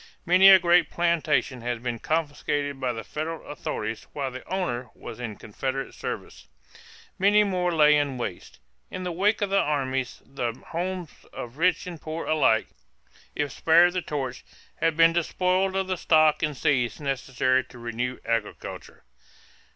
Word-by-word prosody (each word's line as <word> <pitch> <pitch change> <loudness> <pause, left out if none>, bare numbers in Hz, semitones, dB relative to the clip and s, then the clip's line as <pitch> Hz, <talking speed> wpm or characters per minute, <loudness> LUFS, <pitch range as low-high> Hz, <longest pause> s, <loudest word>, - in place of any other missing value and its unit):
Many 185 +3 +7
a 190 - +10
great 175 -2 +3
plantation 160 -6 0
had 120 0 -3
been 120 -2 -3
confiscated 145 -2 -2
by 130 -2 0
the 115 -1 -6
federal 160 +2 -5
authorities 110 -6 -5
while 135 -2 -3
the 130 0 -8
owner 125 -11 -2
was - - -9
in 115 -4 -5
Confederate 130 +6 -4
service. - - -7 0.7
Many 205 +2 +5
more 180 -3 0
lay 150 -2 +5
in 145 -3 0
waste. 100 -7 -6 0.3
In 185 - -6
the 180 - -3
wake 205 +5 +1
of 200 - -2
the 195 - +4
armies 135 -5 -1
the 125 -4 -3 0.2
homes 180 0 -3 0.2
of 120 +5 -8
rich 180 -1 +2
and 175 -3 -8
poor 160 +1 -5
alike, 135 -8 +2 0.7
if 145 -2 -1
spared 170 +5 +4
the 185 - -1
torch, 135 -6 -4 0.3
had 165 -1 0
been 165 0 +6
despoiled 185 +3 +1
of 190 0 +1
the 185 -1 -2
stock 155 -2 +4
and 150 -3 -1
seeds 125 -6 +1
necessary 130 -2 0
to 125 -1 -15
renew 120 +2 -3
agriculture. 115 -2 -4
150 Hz, 160 wpm, -26 LUFS, 130-175 Hz, 0.7 s, a